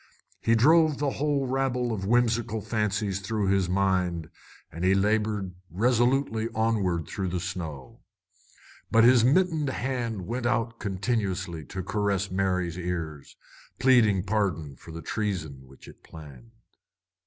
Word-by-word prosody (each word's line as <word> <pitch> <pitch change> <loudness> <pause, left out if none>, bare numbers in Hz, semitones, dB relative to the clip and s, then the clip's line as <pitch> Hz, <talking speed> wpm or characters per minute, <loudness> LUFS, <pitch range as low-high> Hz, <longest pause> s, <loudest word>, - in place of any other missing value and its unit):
He 115 - +2
drove 155 +4 +4
a 140 - +1
whole 145 -1 0
rabble 125 -2 0
of 95 -3 -4
whimsical 115 -1 +1
fancies 105 -2 -1
through 100 0 -1
his 95 -2 +2
mind, 90 -3 0 0.4
as 85 - -8
he 95 +1 +4
labored 105 -1 0 0.2
resolutely 120 - +1
onward 100 -7 0
through 95 -2 -3
the 90 0 -2
snow. 80 -7 -6 0.9
But 115 0 +5
his 120 -1 +6
mittened 155 +1 +2
hand 120 -7 -3
went 120 +3 -2
out 115 -2 -1
continuously 95 - -2
to 95 +8 -6
caress 100 -1 -1
Mary's 90 -2 -1
ears, 85 -5 -5 0.4
pleading 115 -8 +4
pardon 95 -8 -1
for 80 - -13
the 85 +1 -8
treason 80 -11 -3
which 65 +1 -16
it - - -14
planned. 70 -7 -13
100 Hz, 130 wpm, -27 LUFS, 90-120 Hz, 0.9 s, his